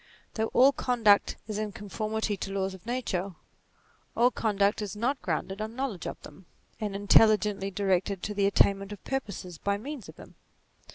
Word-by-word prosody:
Though 220 0 0
all 260 +4 +5
conduct 230 -7 +3
is 215 -1 -3
in 215 -1 -3
conformity 215 +2 -3
to 195 0 -5
laws 195 -1 -1
of 190 +3 -13
nature, 200 -7 -2 0.8
all 245 +2 +5
con 220 -3 -1
duct 200 +2 +2
is 210 -1 -4
not 250 +6 -1
grounded 190 +3 -3
on 220 +1 -5
knowledge 255 -9 -3
of - - -6
them, 165 +4 -13 0.3
and 210 -2 -3
intelligently 205 -1 +4
directed 195 -1 0
to 210 - -2
the 200 -1 +2
attainment 200 0 +2
of 205 - -9
purposes 200 -10 -4
by 200 0 0
means 265 +2 -7
of - - -11
them. - - -13
205 Hz, 175 wpm, -28 LUFS, 195-220 Hz, 0.8 s, all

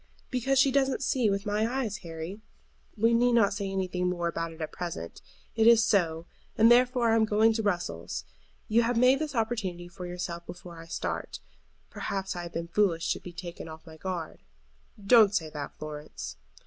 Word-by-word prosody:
"Because 265 +2 +1
she 270 +1 +5
doesn't 270 0 +1
see 250 -4 +2
with 200 0 -1
my 210 +2 0
eyes, 245 -6 -2
Harry. 170 +2 -7 0.6
We 230 +2 +3
need 240 +1 +4
not 225 -5 +4
say 200 -1 -3
anything 185 -2 -1
more 175 -1 -1
about 165 0 -3
it 160 - -13
at 155 - -4
present. 170 - -6 0.3
It 225 0 +4
is 230 -1 +7
so; 170 -6 +1 0.3
and 225 +2 +6
therefore 245 -1 +4
I - - +4
am 220 -1 +3
to - - -15
go 220 +2 +4
to 220 0 -1
Brussels. 85 - -2 0.4
You 225 +2 +4
have 235 0 0
made 255 +3 +5
this 305 -3 -3
opportunity 215 -7 -2
for 175 +1 -8
yourself 175 -1 -5
before 175 -1 -9
I 165 - -12
start. - - -4 0.5
Perhaps 195 -1 -3
I 175 - -4
have 170 -1 -8
been 165 0 -3
foolish 170 -2 +1
to - - -8
be 180 - -9
taken 175 -2 -8
off 160 0 -11
my 160 -1 -12
guard." 175 -2 -5 0.7
"Don't 210 -2 +6
say 160 -6 -1
that, 145 -2 -6
Florence." 150 - -7
195 Hz, 195 wpm, -28 LUFS, 170-230 Hz, 0.7 s, is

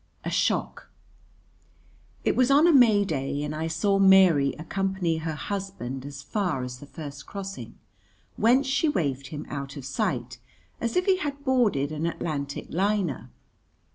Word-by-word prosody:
A - - -2
Shock - - -1 1.4
It - - +2
was 255 0 +3
on 285 +4 +6
a 345 - +5
May 220 -7 +6
day, 140 -3 -2
and 150 0 -3
I 160 +1 -2
saw 195 +5 +1
Mary 185 -8 +6
accompany 185 0 -1
her 160 -1 -3
husband 150 -9 -5
as 140 -1 -9
far 175 - -1
as 125 0 -6
the 145 - -11
first 145 -2 -9
crossing, 195 - -7 0.6
whence 250 +5 +3
she 270 +4 +1
waved 140 - -1
him 150 +1 -7
out 140 -1 -6
of 135 - -7
sight 130 - -2 0.4
as 235 -1 -2
if 360 - +2
he 385 -2 +4
had 285 -5 -5
boarded 215 - +2
an 155 +2 -2
Atlantic 145 -4 -4
liner. 185 - -1
165 Hz, 155 wpm, -26 LUFS, 140-205 Hz, 1.4 s, on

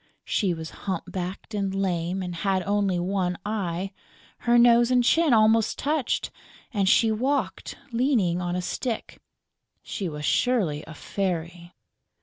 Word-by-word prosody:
She 195 -4 +1
was 160 -1 -5 0.2
hump 185 -3 -1
backed 185 +4 -5
and 195 -2 -1
lame 185 -1 -1
and 180 -1 -4
had 190 +1 0
only 200 -2 +1
one 180 0 -1
eye; 195 -3 -2 0.5
her 240 0 +3
nose 235 0 +6
and 250 -1 +4
chin 320 +4 +3
almost 220 -1 +4
touched; 295 -3 -1 0.4
and 195 -3 +2
she 225 +2 +4
walked 260 +6 -1
leaning 230 -8 +1
on 175 0 -2
a 180 - -2
stick. 235 +4 -4 0.6
She 190 -4 -4
was 150 -1 -5
surely 195 -13 +1
a 160 - -9
fairy. 175 -2 -4
195 Hz, 140 wpm, -25 LUFS, 175-230 Hz, 0.6 s, nose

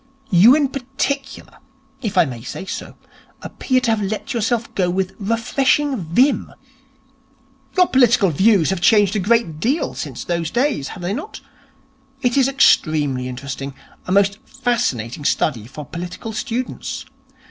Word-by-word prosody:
You 205 +9 +7
in 290 -3 +2
particular, 270 +1 -4 0.4
if 215 -6 -3
I - - +6
may 125 -5 -7
say 190 - -7
so, - - -6 0.5
appear 255 -1 0
to 245 -3 +1
have 220 -1 0
let 205 +5 -3
yourself 230 0 -1
go 180 -2 +1
with 185 +1 -1
refreshing 260 +6 +1
vim. 235 - +1 1.3
Your 365 - +6
political 240 - +4
views 190 +1 +3
have 190 -3 -2
changed 205 +1 +4
a - - +1
great 200 -6 +1
deal 265 - 0
since - - -6
those 170 -2 -2
days, 245 - 0
have 180 - -9
they 180 +3 -1
not? 300 - -6 0.8
It 245 -1 +2
is 270 -2 +4
extremely 150 - +2
interesting. 135 +1 -6 0.3
A - - -3
most 200 +1 +3
fascinating 185 - -2
study 120 -6 0
for 145 +3 -9
political 175 - -7
students. 240 +3 -4
210 Hz, 145 wpm, -20 LUFS, 170-250 Hz, 1.3 s, You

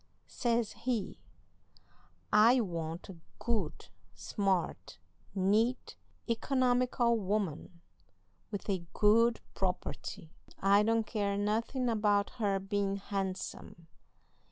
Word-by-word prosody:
Says 235 -2 0
he: 235 -5 -3 1.1
'I 230 +4 +6
want 165 -3 -4
a 190 - -10 0.2
good, 215 - -2 0.3
smart, 185 - -1 0.4
neat, 215 +6 +1 0.3
economical 245 -1 +2
woman, 185 -4 -2 0.7
with 205 -2 -5
a 190 -4 -1
good 230 +3 +4
property. 180 -3 -3 0.3
I 200 +1 +4
don't 225 +1 +2
care 205 -3 -1
nothin' 225 +5 0
about 210 -3 +2
her 200 -2 +2
bein' 195 0 -1
handsome. 195 -3 -5
205 Hz, 90 wpm, -32 LUFS, 195-230 Hz, 1.1 s, I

